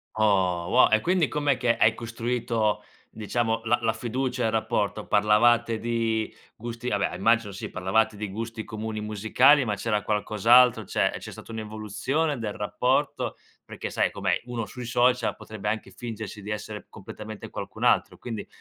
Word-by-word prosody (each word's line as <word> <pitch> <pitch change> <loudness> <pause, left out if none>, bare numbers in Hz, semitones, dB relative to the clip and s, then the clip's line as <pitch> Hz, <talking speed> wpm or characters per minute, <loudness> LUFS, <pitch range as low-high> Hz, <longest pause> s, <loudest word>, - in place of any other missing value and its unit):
Oh 95 -5 +2
wo 125 - +6
e 110 - +4
quindi 180 0 +2
com'è 145 -3 0
che 120 -2 +1
hai 110 - +5
costruito 115 -1 -1 0.3
diciamo 115 +1 -1
la 120 +2 +3
la 110 -1 +1
fiducia 125 +2 -2
e - - +2
il - - 0
rapporto? 105 -1 -1
Parlavate 115 +3 +4
di 115 -1 -1 0.2
gusti 120 +2 -5
vabbè, - - 0
immagino 110 -2 +2
sì 95 - -6
parlavate 110 +3 +1
di 105 0 -4
gusti 115 +2 -5
comuni 110 0 -5
musicali 110 +7 +4
ma 105 -4 -1
c'era 105 0 -1
qualcos'altro, 110 +3 +4
cioè - - +1
c'è - - -8
stata - - -11
un'evoluzione 110 +7 -2
del 110 -3 -3
rapporto? 125 +7 0 0.3
Perché - - -6
sai - - +1
com'è, - - 0
uno 120 -2 -4
sui 125 +2 -8
social 120 0 +2
potrebbe 105 -1 -8
anche 110 0 -3
fingersi 110 -3 -7
di 105 +2 -6
essere 105 0 -6
completamente 110 +1 -9
qualcun - - -7
altro, - - +3
quindi 115 -4 -6
110 Hz, 160 wpm, -26 LUFS, 105-120 Hz, 0.3 s, wo